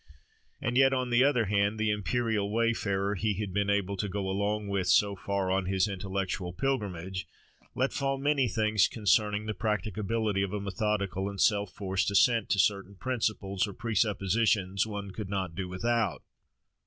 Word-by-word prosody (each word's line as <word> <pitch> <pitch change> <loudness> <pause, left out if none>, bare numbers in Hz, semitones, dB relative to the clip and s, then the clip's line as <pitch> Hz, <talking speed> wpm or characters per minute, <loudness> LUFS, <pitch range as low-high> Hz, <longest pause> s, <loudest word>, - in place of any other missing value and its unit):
And 125 -3 -1
yet, 135 0 +5
on 130 -1 -1
the 120 +2 +5
other 125 -5 +3
hand, 100 +1 +1
the 110 -1 +1
imperial 105 0 0
wayfarer, 105 -3 0
he 105 +1 -1
had 100 -1 -4
been 100 0 0
able 100 -1 0
to 100 +1 -2
go 95 0 -3
along 100 +2 -1
with 100 -2 -1
so 100 +3 +4
far 100 0 -2
on 95 -1 0
his 95 +1 +2
intellectual 95 -2 -3
pilgrimage, 95 -7 -2 0.5
let 130 +2 0
fall 135 0 -1
many 140 -1 +2
things 110 -2 +2
concerning 105 0 +1
the 110 - -2
practicability 105 0 -1
of 100 0 -2
a 105 - -1
methodical 100 0 -1
and 100 -1 -8
self 100 -2 +2
forced 95 -1 -1
assent 115 +2 +3
to - - +2
certain 100 0 +1
principles 105 -4 -1
or 100 - -7
presuppositions 105 -2 +1
"one 100 -2 -5
could 100 0 -6
not 95 -4 -2
do 90 +2 -4
without." 110 +1 -1
100 Hz, 165 wpm, -29 LUFS, 95-110 Hz, 0.5 s, yet